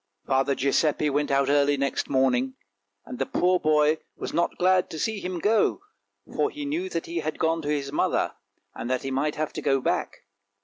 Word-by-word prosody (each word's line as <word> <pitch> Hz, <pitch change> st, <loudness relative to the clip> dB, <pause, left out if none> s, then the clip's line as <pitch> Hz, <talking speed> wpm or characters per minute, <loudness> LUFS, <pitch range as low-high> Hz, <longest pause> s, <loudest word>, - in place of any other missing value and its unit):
Father 135 Hz, 0 st, +1 dB
Giuseppe 145 Hz, +2 st, +1 dB
went 145 Hz, +1 st, 0 dB
out 140 Hz, -1 st, +2 dB
early 145 Hz, 0 st, +3 dB
next 140 Hz, 0 st, -1 dB
morning, 130 Hz, -1 st, +2 dB, 0.5 s
and 125 Hz, -, -8 dB
the 135 Hz, -, +1 dB
poor 180 Hz, 0 st, +2 dB
boy 155 Hz, 0 st, +3 dB, 0.2 s
was -, -, -6 dB
not 170 Hz, -, 0 dB
glad 185 Hz, 0 st, +3 dB
to 160 Hz, -, -6 dB
see 220 Hz, +5 st, -1 dB
him 180 Hz, -1 st, -4 dB
go, 215 Hz, -, +2 dB, 0.6 s
for 425 Hz, -, +2 dB
he 295 Hz, -6 st, -6 dB
knew 335 Hz, +6 st, -2 dB
that -, -, -3 dB
he 340 Hz, 0 st, -5 dB
had 155 Hz, -, -3 dB
gone 165 Hz, 0 st, +1 dB
to 145 Hz, -, -4 dB
his 140 Hz, -2 st, -1 dB
mother, 150 Hz, -, 0 dB, 0.4 s
and 120 Hz, -, -6 dB
that 130 Hz, -1 st, -1 dB
he 135 Hz, -, -3 dB
might 145 Hz, +3 st, 0 dB
have 155 Hz, 0 st, -3 dB
to -, -, -4 dB
go 135 Hz, -1 st, +2 dB
back. -, -, -2 dB
150 Hz, 205 wpm, -26 LUFS, 135-180 Hz, 0.6 s, early